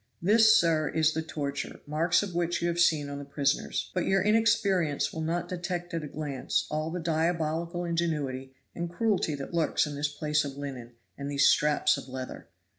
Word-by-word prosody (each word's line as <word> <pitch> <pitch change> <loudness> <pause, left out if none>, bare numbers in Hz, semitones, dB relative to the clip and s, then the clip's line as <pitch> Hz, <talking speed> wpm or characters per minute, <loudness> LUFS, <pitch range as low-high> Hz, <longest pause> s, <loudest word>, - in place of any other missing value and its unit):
This, 220 +4 +6
sir, 160 -3 +2
is 155 -1 +2
the 160 - -1
torture, 140 -3 -4
marks 160 +6 +2
of 195 -3 -5
which 175 0 0
you 170 - 0
have 170 0 -2
seen 155 -4 +3
on 140 0 -5
the - - -6
prisoners; 140 0 -1
but 180 - -1
your 195 - +3
inexperience 210 -8 +2
will 160 - -4
not 165 +2 -1
detect 175 0 -4
at 165 -2 -2
a - - -5
glance 145 -3 -2
all 155 +1 -1
the 180 +2 -4
diabolical 165 +1 -1
ingenuity 150 -6 -2 0.2
and 170 0 -4
cruelty 190 -4 0
that 140 +4 -7
lurks 165 -1 +2
in 150 - -5
this 145 0 -2
piece 150 +1 0
of 140 -1 -6
linen 130 -4 -7 0.3
and 140 0 -4
these 140 -1 +3
straps 150 -1 +3
of - - -8
leather. 130 0 -7
160 Hz, 190 wpm, -28 LUFS, 145-175 Hz, 0.3 s, This